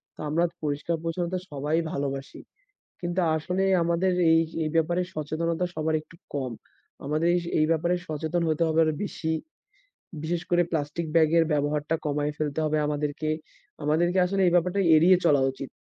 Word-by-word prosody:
তো - - -29
আমরা 165 +3 +2 0.2
পরিষ্কার-পরিচ্ছন্নতা 165 +4 -2
সবাই 145 +2 -1 0.2
ভালোবাসি। 140 -1 -4 0.6
কিন্তু 175 +1 -2 0.2
আসলে 180 +4 -1 0.2
আমাদের 170 +2 +1 0.2
এই, 165 0 +5 0.2
এই 155 - -1
ব্যাপারে 170 +2 +2
সচেতনতা 160 +3 -1
সবার 160 0 0
একটু 155 - -18 0.2
কম। 135 -3 -2 0.5
আমাদের 155 +4 +1 0.3
এই 155 - +4
ব্যাপারে 170 +2 +2
সচেতন 160 +3 -2
হতে 155 +2 +1
হবে 160 0 +1
আরও 155 -1 +1
বেশি। 160 -4 -3 0.9
বিশেষ 170 +1 -1
করে 175 0 +4
প্লাস্টিক 160 +1 -2
ব্যাগের 165 0 +5
ব্যবহারটা 150 +2 0
কমায় 145 0 0
ফেলতে 150 0 -2
হবে 155 0 +1
আমাদেরকে। 150 +1 -2 0.5
আমাদেরকে 175 +5 +2
আসলে 195 +2 0
এই - - +3
ব্যাপারটা 180 +3 +2
এড়িয়ে 175 +4 +6
চলা 145 -4 +4
উচিত। 135 0 -8
160 Hz, 150 wpm, -26 LUFS, 150-170 Hz, 0.9 s, এড়িয়ে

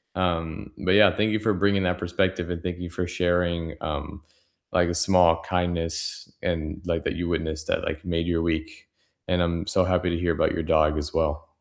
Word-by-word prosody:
Um, 85 +1 -2
but 90 - +2
yeah, 105 -3 +6
thank 110 +1 +2
you 110 - +1
for 110 0 +1
bringing 100 +1 +2
that 90 0 +1
perspective, 90 0 -1
and 85 -1 -3
thank 90 0 -4
you 90 -1 -5
for 90 +1 -3
sharing, 85 -2 0
um, - - -5 0.5
like, 90 -2 +3
a - - -1
small 85 -2 +4
kindness 85 -2 -2
and, 85 +1 -2
like 85 -2 -1
that - - -1
you 85 0 -2
witnessed 80 -2 -2
that, - - 0
like, - - -4
made 85 -1 -1
your 85 -1 +1
week. 80 -1 -3 0.4
And 90 -1 +2
I'm 85 -1 -1
so 95 - +2
happy 90 0 +1
to 85 - -1
hear 85 0 +1
about - - +2
your 85 - -2
dog 75 -1 +3
as 75 0 -4
well. 75 -2 0
85 Hz, 205 wpm, -25 LUFS, 80-90 Hz, 0.5 s, yeah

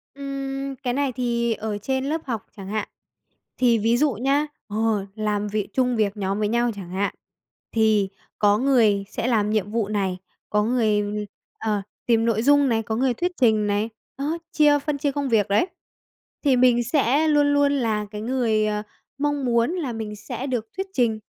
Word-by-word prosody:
Ừm, 275 0 -4
cái 250 -1 -3
này 280 0 0
thì 235 -2 0
ở 215 -1 -4
trên 265 +6 -2
lớp 310 +3 -1
học 230 -6 -3
chẳng 195 -1 -8
hạn. 215 0 -2 0.7
Thì 240 -2 +4
ví 230 +3 +2
dụ 290 0 +2
nhá 275 +7 +1 0.2
ờ, 215 -1 0
làm 210 -1 -1
vị 210 -1 -2
chung 250 -2 +2
việc 215 -2 0
nhóm 195 0 -1
với 210 - +1
nhau 235 +2 +1
chẳng 190 -4 -8
hạn, 195 +2 -1 0.6
thì 215 -3 +3 0.3
có 205 0 +4
người 225 -6 +3
sẽ 230 - -3
làm 215 -4 +2
nhiệm 210 -2 0
vụ 225 -2 0
này, 195 -3 -1 0.3
có 210 0 +2
người 215 -3 +2 0.6
ờ, 210 -2 0 0.2
tìm 230 -1 +3
nội 225 -2 +2
dung 285 0 +5
này, 225 -1 +1
có 220 +1 -3
người 255 +2 +2
thuyết 355 +8 -1
trình 220 -3 +4
này, 205 +2 0 0.3
đó, 295 +4 -1
chia 295 -1 +4
phân 290 0 -2
chia 285 0 0
công 280 -1 -2
việc, 215 -3 +3
đấy, 205 - +2 0.8
thì 275 -3 +4
mình 245 -1 +4
sẽ 280 +4 +2
luôn 295 -1 +4
luôn 285 0 +4
là 225 -6 0
cái 210 -1 -5
người, 225 -3 +1
ờ, 210 0 -1 0.3
mong 290 -1 0
muốn 235 +3 +2
là 325 -9 -3
mình 220 -2 -5
sẽ 245 +5 -6
được 240 -4 -2
thuyết 385 +1 -2
trình, 230 - +1
235 Hz, 190 wpm, -24 LUFS, 210-270 Hz, 0.8 s, dung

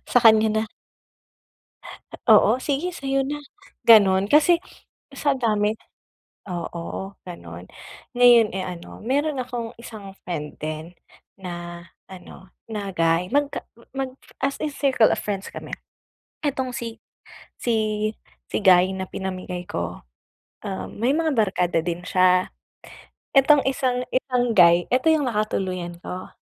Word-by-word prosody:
Sa 245 - +6
kanya 220 -1 +6 0.2
na." 220 - -14 1.6
Oo, 220 +1 +6
sige 285 +6 -1
sa'yo 275 -5 -1
na, 290 +2 -3 0.5
ganun. 200 -4 +7
Kasi 305 +8 +5 0.6
sa 275 -1 0
dami 215 -2 +1 0.7
oo, 175 +2 -5
ganun. 90 - -10 0.5
Ngayon, 240 -3 +7
eh, 185 0 -4
ano, 175 -1 -8
meron 285 +4 0
akong 245 -2 -5
isang 210 -4 -10
friend 150 -4 -5
din 155 +3 -6 0.4
na 175 -2 -7 0.2
ano, 185 0 -12 0.2
na 210 -3 -5
guy, 165 +2 +2
magka 285 +1 0 0.3
mag 265 -1 -4 0.2
as 275 +1 0
in 300 -2 -3
circle 265 -6 +3
of - - -3
friends 195 -2 -4
kami. - - -8 0.8
Itong 260 -2 -1
si 230 -3 -6 0.6
si 240 - 0 0.7
si - - -2
guy 185 0 +5
na 190 - -3
pinamigay 185 -2 -5
ko, 85 0 -4 0.7
um, 95 0 -4
may 240 +5 +1
mga 315 -3 0
barkada 180 -6 +1
din 175 -1 -3
siya. 185 0 +3 0.9
Itong 280 +2 +6
isang 250 -1 0
itong 250 -2 +1
guy, 175 -1 +6
ito 255 +4 +1
yung 300 -3 +1
nakatuluyan 185 -6 -2
ko. 185 +1 -7
210 Hz, 125 wpm, -23 LUFS, 180-255 Hz, 1.6 s, ganun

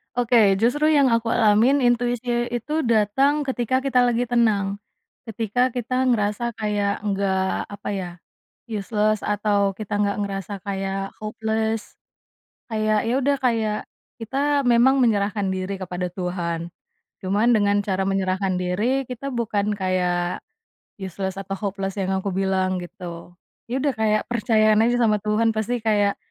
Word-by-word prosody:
Oke 230 -5 +4
justru 295 +7 +2
yang 285 -3 +5
aku 230 -1 +1
alamin 230 +5 +4
intuisi 245 -1 +1 0.2
itu 300 +7 -2
datang 265 +6 +2
ketika 260 0 0
kita 260 -2 +2
lagi 245 0 +1
tenang, 215 -5 +1 0.5
ketika 230 +3 -1
kita 255 +2 -1
ngerasa 235 -1 0
kayak 205 -1 0
enggak 195 -2 -1
apa 205 0 -6
ya, 185 -2 -4 0.6
useless 215 0 -1
atau 205 -1 +1
kita 205 +1 -5
enggak 205 0 0
ngerasa 200 0 -4
kayak 195 0 -3
hopeless, 220 0 -3 0.7
kayak 215 -1 0
ya 235 - +1
udah 280 +1 +2
kayak 225 -4 0 0.4
kita 280 +4 0
memang 245 +3 +5
menyerahkan 205 -4 +1
diri 190 +1 -3
kepada 180 -1 -4
Tuhan, 175 -2 -3 0.6
cuman 205 +5 +1
dengan 205 -1 +2
cara 195 -2 -1
menyerahkan 190 -1 0
diri 220 +9 0
kita 260 +2 -5
bukan 210 -4 -1
kayak, 180 -2 -1 0.6
useless 190 0 -4
atau 195 0 -5
hopeless 195 -1 -4
yang 190 -1 -1
aku 200 - -4
bilang 190 -1 +1
gitu, 175 -1 -9 0.4
ya 255 +3 -1
udah 280 -1 0
kayak 215 -1 +2
percayaan 215 -2 +3
aja 240 +1 +2
sama 220 -3 +3
Tuhan 220 +2 +2
pasti 235 +3 -1
kayak 205 -2 +1
215 Hz, 135 wpm, -23 LUFS, 195-240 Hz, 0.7 s, yang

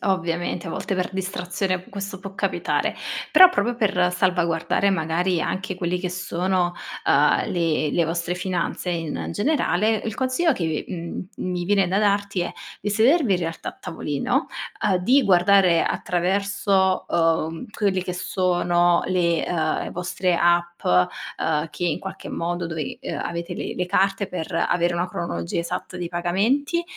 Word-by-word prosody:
ovviamente 175 -2 -1
a - - -4
volte 190 +1 -3
per 185 +1 -2
distrazione 185 0 -2
questo 200 0 -5
può 195 +1 -9
capitare, - - -1 0.3
però 370 0 +9
proprio 245 -9 0
per 185 -6 +2
salvaguardare 180 0 +1
magari 170 0 0
anche 190 0 -3
quelli 180 0 -1
che 180 - -2
sono, 180 0 0 0.3
uhm, - - +4
le 165 -3 +1
le 170 - +2
vostre 170 +2 -2
finanze 180 0 -2
in 165 -2 -2
n - - -4
generale, 220 - +1
il 220 - -3
consiglio 260 +6 +2
che, 160 -3 -2
mhmm, 175 0 -5
mi 180 -1 -3
viene 195 0 +3
da 190 +3 +1
darti 200 -2 +1
è 175 - -2 0.3
di 205 - -2
sedervi 235 - +4
in - - 0
realtà 165 -1 -4
a - - -8
tavolino, 160 - -1 0.4
uhm, 190 - +3
di 255 +9 +4
guardare 185 -2 +5
attraverso, 190 +1 +1
uhm, 165 -1 +1
quelle 200 -3 0
che 180 0 -4
sono 175 -1 +2
le, 170 -3 +1
uhm, 160 -3 -1
vostre 180 0 -1
app, 175 0 +2
uhm, 150 - 0
che 175 - -4
in 170 - 0
qualche 190 - -7
modo 175 +1 -2
dove, 160 -3 -4
uhm, - - -4
avete 170 +1 -4
le - - -4
le 180 - -1
carte 195 +2 +1
per 165 -3 -5
avere 175 0 +1
una 175 +2 -1
cronologia 85 - -3
esatta 170 +1 -5
dei 175 - -3
pagamenti, 215 - 0
180 Hz, 155 wpm, -23 LUFS, 170-195 Hz, 0.4 s, però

